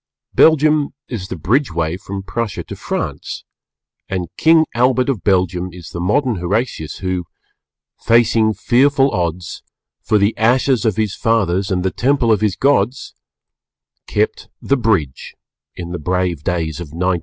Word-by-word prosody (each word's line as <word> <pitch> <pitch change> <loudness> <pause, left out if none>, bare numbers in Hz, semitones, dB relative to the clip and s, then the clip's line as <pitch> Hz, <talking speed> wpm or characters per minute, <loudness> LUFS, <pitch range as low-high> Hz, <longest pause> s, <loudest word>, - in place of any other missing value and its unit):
Belgium 155 -2 +4
is 105 -7 -5
the - - -5
Bridgeway 85 - 0
from 100 -1 -6
Prussia 115 +1 -3
to - - -8
France, - - -4 0.7
and 90 -3 -3
King 160 0 +4
Albert 125 +2 +2
of 115 -11 -2
Belgium 90 -2 +1
is 85 -2 -11
the 85 - -6
modern 115 +6 +1
Horatius 90 - -2
who 90 -1 -1 0.4
"... - - -60
facing 115 -2 +3
fearful 135 +2 +3
odds, 85 -1 -3 0.4
For 105 - +2
the 100 +2 +2
ashes 125 +1 +2
of 110 -4 +2
his 105 -2 -1
fathers 100 -5 +1
And 90 -2 0
the 95 - 0
temples 125 -3 +2
of 105 - 0
his 105 -5 +1
Gods," 130 -3 +1 0.9
kept - - -1
"the 140 - +1
bridge" 100 - -1 0.4
in 85 -1 -7
the 90 - -4
brave 90 -1 -1
days 80 -2 -2
of 85 - -5
1914. 90 +4 -1
100 Hz, 150 wpm, -18 LUFS, 90-125 Hz, 0.9 s, Belgium